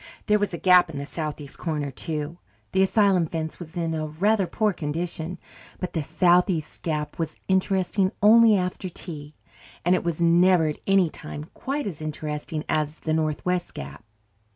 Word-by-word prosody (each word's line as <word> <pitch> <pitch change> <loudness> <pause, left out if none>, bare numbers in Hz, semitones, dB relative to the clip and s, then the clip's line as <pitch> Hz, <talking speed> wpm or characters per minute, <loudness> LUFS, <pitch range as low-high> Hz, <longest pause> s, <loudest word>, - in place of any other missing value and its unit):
There 210 0 +3
was 205 - 0
a 170 - -4
gap 180 0 +5
in 150 - -6
the 140 - -4
southeast 150 -2 -5
corner, 150 -4 -2
too 155 +4 -4 0.3
the 190 - +2
asylum 190 -3 +3
fence 160 0 -4
was 170 -1 -9
in 165 -1 -1
a 155 -1 -2
rather 195 +5 +1
poor 215 +1 +1
condition 165 +2 -4 0.4
but 180 - -4
the 160 - 0
southeast 175 +1 +2
gap 150 -2 -3
was 160 -2 -3
interesting 190 0 +1
only 220 0 +7
after 185 0 -3
tea, 150 -4 -8 0.5
and 175 - +4
it 185 - +1
was 170 -2 -2
never 170 0 +5
at 150 - -3
any 195 -4 +4
time 150 0 -7
quite 285 +2 -3
as 170 -7 -5
interesting 150 0 -4
as 150 0 -1
the 155 - -1
northwest 160 +3 -1
gap. 70 +6 -8
170 Hz, 170 wpm, -25 LUFS, 155-185 Hz, 0.5 s, only